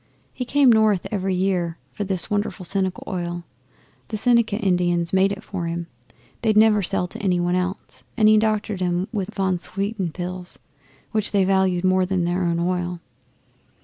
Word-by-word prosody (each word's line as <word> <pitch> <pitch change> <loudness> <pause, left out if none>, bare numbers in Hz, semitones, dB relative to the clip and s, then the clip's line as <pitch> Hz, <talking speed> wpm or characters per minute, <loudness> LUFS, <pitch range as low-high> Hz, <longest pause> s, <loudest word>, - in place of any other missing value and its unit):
He 250 - -4
come 270 0 +4
north 215 -4 +3
every 190 -2 -1
year 180 -3 0
for 205 - -4
this 190 -3 0
wonderful 205 -2 -2
Seneca 190 0 -1
Oil 175 -1 -4 0.6
the 215 - -4
Seneca 235 -1 +3
Indians 175 -4 +1
made 195 +1 +3
for 180 -4 -4
him. 170 0 -3 0.6
They'd 215 -2 +2
never 215 -1 +5
sell 180 -1 0
to - - -8
any 185 -3 +1
one 175 0 0
else, 185 +2 -4
and 215 -2 +5
he 215 0 +6
doctored 215 -3 -1
'em 180 +1 0
with 200 -4 -3
von 190 -2 0
Swieten 195 -1 -2
pills, 180 +1 -6 0.5
which 215 -1 0
they 195 -2 +3
valued 190 -2 +2
more 185 0 +3
than 185 -2 0
their 175 +2 0
own 170 -1 +1
oil. 175 0 -1
190 Hz, 170 wpm, -23 LUFS, 180-205 Hz, 0.6 s, he